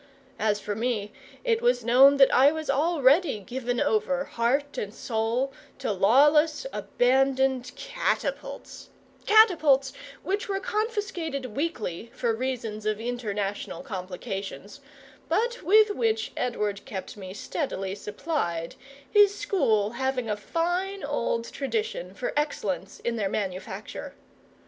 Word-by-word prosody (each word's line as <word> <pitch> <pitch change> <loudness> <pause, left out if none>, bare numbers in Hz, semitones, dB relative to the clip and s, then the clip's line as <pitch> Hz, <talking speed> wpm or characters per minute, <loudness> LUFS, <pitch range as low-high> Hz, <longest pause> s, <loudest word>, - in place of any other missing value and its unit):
As 210 -1 +1
for 210 - -4
me, 215 -2 -2 0.3
it 460 -2 +1
was 245 -1 +2
known 270 +4 +7
that 270 -1 +6
I 275 +3 +6
was 315 -2 -2
already 290 -1 +3
given 245 +3 -3
over, 270 +5 +1
heart 275 +4 0
and 205 - -3
soul, 230 +4 -1 0.2
to - - -2
lawless 295 - +4
abandoned 265 0 +1
catapults - - -3 0.4
catapults 315 -11 +5 0.3
which 400 +2 -2
were 390 -1 0
confiscated 385 - -3
weekly 235 - -3
for 235 -2 0
reasons 225 -3 -3
of 215 0 0
international 215 -2 -3
complications, 195 - -6 0.5
but 475 +8 0
with 425 +2 +5
which 225 - 0
Edward 210 -5 -2
kept 190 -3 -6
me 190 -3 -8
steadily 195 - -3
supplied, 200 - -3 0.3
his 410 +4 +5
school 220 - +1
having 265 -1 -2
a 210 - 0
fine 350 - -2
old 235 -5 -1
tradition 440 - -3
for - - -3
excellence 200 - -2
in 235 0 -2
their 200 -3 0
manufacture. 190 -2 -5
255 Hz, 120 wpm, -27 LUFS, 210-315 Hz, 0.5 s, known